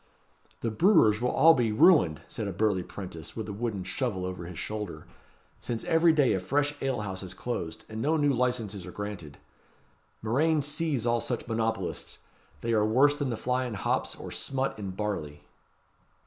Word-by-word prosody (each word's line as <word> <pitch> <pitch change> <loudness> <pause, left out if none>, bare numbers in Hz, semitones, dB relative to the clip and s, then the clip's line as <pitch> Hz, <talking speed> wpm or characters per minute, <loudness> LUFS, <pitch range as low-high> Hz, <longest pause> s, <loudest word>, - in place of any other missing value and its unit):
"The 115 - -1
brewers 110 - +4
will 155 +6 +6
be 120 -6 +1
all - - -3
ruined," 100 - +5
said - - -4
a - - -2
burly 105 -4 +1
'prentice, 90 -4 -8
with 110 -2 -4
a 105 - -4
wooden 105 -3 -3
shovel 95 -2 -2
over 90 -1 -5
his 90 -2 -8
shoulder; 105 -7 -5 0.5
"since 115 -2 -4
every 165 +1 +4
day 145 -5 +3
a 95 - +1
fresh 145 +10 0
ale 135 -4 -1
house 95 -3 -4
is 90 -1 -6
closed; 85 -8 -4
and 110 0 -5
no 155 +5 +2
new 145 -2 +3
licences 115 -7 -1
are - - -7
granted. 100 -8 -6 0.9
Murrain 150 +7 +2
seize 150 -4 -1
all 120 -1 +2
such 120 - -3
monopolists! 110 -4 -2 0.4
They 115 0 0
are 105 -1 +3
worse 130 +7 +4
than 145 -2 -2
the 115 - -2
fly 125 +3 0
in 115 - -5
hops, 95 - -1
or - - -8
smut 135 -4 -2
in 100 -2 -4
barley." 95 -7 -4
110 Hz, 180 wpm, -28 LUFS, 95-135 Hz, 0.9 s, will